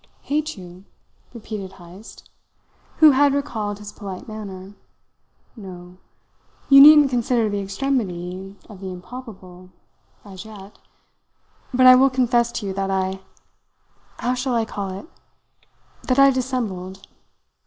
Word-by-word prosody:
"Hate 305 Hz, -1 st, -2 dB
you?" 180 Hz, +1 st, -13 dB, 0.5 s
repeated 210 Hz, -5 st, -8 dB
Heyst, 185 Hz, +4 st, -14 dB, 0.7 s
who 310 Hz, -2 st, +7 dB
had 280 Hz, +1 st, +3 dB
recalled 220 Hz, -8 st, -3 dB
his 205 Hz, 0 st, -10 dB
polite 195 Hz, -4 st, -9 dB
manner. 200 Hz, -3 st, -9 dB, 0.8 s
"No! 180 Hz, -4 st, -11 dB, 0.7 s
You 275 Hz, 0 st, +9 dB
needn't 295 Hz, -1 st, +8 dB
consider 240 Hz, -2 st, +1 dB
the 205 Hz, -, -2 dB
extremity 195 Hz, -4 st, -3 dB
of 205 Hz, -3 st, -13 dB
the 190 Hz, -1 st, -7 dB
improbable 185 Hz, -2 st, -11 dB, 0.6 s
as 190 Hz, -2 st, -10 dB
yet. 210 Hz, -2 st, -13 dB, 0.9 s
But 255 Hz, 0 st, +3 dB
I 255 Hz, -, +10 dB
will 265 Hz, +2 st, +5 dB
confess 240 Hz, -2 st, +1 dB
to 210 Hz, -, -4 dB
you 195 Hz, -, -3 dB
that 195 Hz, 0 st, -3 dB
I 190 Hz, 0 st, -1 dB, 1.0 s
how 245 Hz, -, -1 dB
shall 255 Hz, 0 st, -2 dB
I 230 Hz, -1 st, +1 dB
call 200 Hz, -3 st, -5 dB
it? 190 Hz, +7 st, -8 dB, 1.0 s
that 255 Hz, -, +1 dB
I 275 Hz, 0 st, +7 dB
dissembled. 215 Hz, -8 st, -4 dB
210 Hz, 125 wpm, -21 LUFS, 190-255 Hz, 1.0 s, I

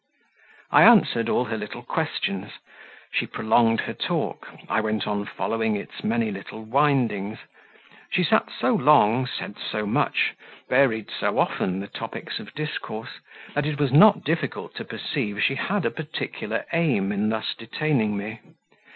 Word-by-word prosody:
I -, -, +7 dB
answered 200 Hz, -, +6 dB
all 125 Hz, -, +2 dB
her 110 Hz, -2 st, -3 dB
little 105 Hz, 0 st, -7 dB
questions; 100 Hz, +1 st, -2 dB, 0.6 s
she -, -, 0 dB
prolonged 115 Hz, +1 st, +2 dB
her -, -, -4 dB
talk, -, -, -2 dB, 0.2 s
I 110 Hz, -, +1 dB
went 110 Hz, -1 st, -1 dB
on 105 Hz, 0 st, -2 dB
following 110 Hz, -1 st, -1 dB
its 100 Hz, -, -7 dB
many 115 Hz, -1 st, 0 dB
little 100 Hz, +3 st, -8 dB
windings; 115 Hz, -5 st, +1 dB, 0.7 s
she 180 Hz, +1 st, +2 dB
sat 220 Hz, +6 st, +2 dB
so 255 Hz, -, +2 dB
long, 130 Hz, -, +4 dB
said 105 Hz, -, -6 dB
so 105 Hz, -1 st, -3 dB
much, 105 Hz, -, +1 dB, 0.3 s
varied 125 Hz, -5 st, +2 dB
so -, -, -1 dB
often 95 Hz, +1 st, 0 dB
the 100 Hz, -, -6 dB
topics -, -, -6 dB
of 105 Hz, -, -11 dB
discourse, 145 Hz, -7 st, -5 dB, 0.3 s
that 145 Hz, 0 st, 0 dB
it 150 Hz, -1 st, -2 dB
was 140 Hz, -3 st, +2 dB
not 200 Hz, +8 st, +7 dB
difficult 160 Hz, +3 st, -2 dB
to -, -, -5 dB
perceive 105 Hz, 0 st, -3 dB
she -, -, +3 dB
had 190 Hz, +6 st, -1 dB
a -, -, +1 dB
particular 155 Hz, -1 st, -4 dB
aim 140 Hz, -13 st, +2 dB
in 105 Hz, +1 st, 0 dB
thus 110 Hz, 0 st, -1 dB
detaining 115 Hz, -3 st, 0 dB
me. 110 Hz, +3 st, -5 dB
115 Hz, 150 wpm, -24 LUFS, 105-145 Hz, 0.7 s, I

